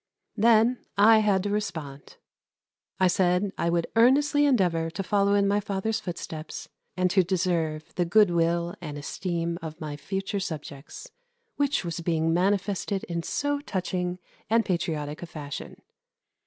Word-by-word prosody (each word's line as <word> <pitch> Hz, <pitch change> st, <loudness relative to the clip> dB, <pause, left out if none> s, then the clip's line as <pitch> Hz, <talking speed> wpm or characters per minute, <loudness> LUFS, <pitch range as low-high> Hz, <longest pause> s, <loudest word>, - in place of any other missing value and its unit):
Then 230 Hz, +2 st, +4 dB, 0.2 s
I 220 Hz, +2 st, +7 dB
had 200 Hz, -3 st, +2 dB
to 205 Hz, -, -2 dB
respond. 160 Hz, -10 st, -5 dB, 0.8 s
I 190 Hz, -, +4 dB
said 180 Hz, +2 st, +2 dB
I 170 Hz, -, 0 dB
would 170 Hz, 0 st, +1 dB
earnestly 285 Hz, +5 st, +4 dB
endeavour 175 Hz, -10 st, +2 dB
to 170 Hz, +4 st, -4 dB
follow 200 Hz, +1 st, +2 dB
in 200 Hz, 0 st, +3 dB
my 205 Hz, +1 st, +2 dB
father's 210 Hz, +1 st, -2 dB
footsteps 165 Hz, -5 st, -6 dB, 0.3 s
and 180 Hz, 0 st, +2 dB
to 190 Hz, -, +5 dB
deserve 170 Hz, -4 st, -1 dB
the 180 Hz, -, +1 dB
good 205 Hz, +1 st, +4 dB
will 170 Hz, 0 st, +1 dB
and 150 Hz, -4 st, -6 dB
esteem 170 Hz, +2 st, -3 dB
of 160 Hz, 0 st, -7 dB
my 150 Hz, -3 st, -5 dB
future 195 Hz, +5 st, -3 dB
subjects, 150 Hz, -5 st, -7 dB, 0.5 s
which 285 Hz, -8 st, +1 dB
was 170 Hz, -1 st, -3 dB
being 165 Hz, -1 st, 0 dB
manifested 195 Hz, +2 st, 0 dB
in 170 Hz, -1 st, -3 dB
so 285 Hz, -, -1 dB
touching 180 Hz, -7 st, -3 dB, 0.3 s
and 225 Hz, +1 st, +3 dB
patriotic 155 Hz, -5 st, -2 dB
a 175 Hz, -, -6 dB
fashion. 145 Hz, -3 st, -7 dB
180 Hz, 145 wpm, -26 LUFS, 165-205 Hz, 0.8 s, I